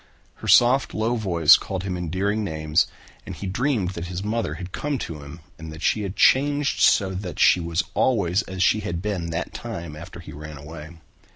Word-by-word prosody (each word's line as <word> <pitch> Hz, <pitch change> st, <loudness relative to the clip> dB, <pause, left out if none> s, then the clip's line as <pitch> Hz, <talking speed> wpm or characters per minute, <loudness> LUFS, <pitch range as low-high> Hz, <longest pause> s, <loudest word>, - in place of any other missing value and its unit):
Her -, -, -8 dB
soft 125 Hz, +3 st, +5 dB
low 110 Hz, +3 st, 0 dB
voice 85 Hz, -8 st, +5 dB
called 95 Hz, -1 st, -5 dB
him 95 Hz, -2 st, -3 dB
endearing 95 Hz, +5 st, -1 dB
names 80 Hz, -2 st, +1 dB, 0.4 s
and -, -, -8 dB
he -, -, -7 dB
dreamed 105 Hz, -1 st, 0 dB
that 85 Hz, -2 st, -6 dB
his 90 Hz, +2 st, -5 dB
mother 105 Hz, -7 st, -2 dB
had 90 Hz, +1 st, -8 dB
come 150 Hz, +5 st, -2 dB
to 80 Hz, -, -6 dB
him 70 Hz, +4 st, -11 dB, 0.2 s
and 80 Hz, -1 st, -8 dB
that 80 Hz, +2 st, -9 dB
she 110 Hz, -, +2 dB
had 100 Hz, -1 st, -4 dB
changed 145 Hz, +1 st, +3 dB
so 95 Hz, -2 st, +4 dB
that 90 Hz, -4 st, -6 dB
she -, -, +5 dB
was 85 Hz, -1 st, -1 dB
always 100 Hz, -6 st, +2 dB
as 95 Hz, -2 st, -3 dB
she 110 Hz, -, +3 dB
had 85 Hz, -4 st, -4 dB
been 95 Hz, -6 st, -2 dB
that 80 Hz, +1 st, -4 dB
time 85 Hz, -10 st, -6 dB
after 85 Hz, +3 st, -10 dB
he 80 Hz, -3 st, -10 dB
ran 75 Hz, 0 st, -9 dB
away. 80 Hz, +3 st, -10 dB
90 Hz, 200 wpm, -23 LUFS, 85-105 Hz, 0.4 s, soft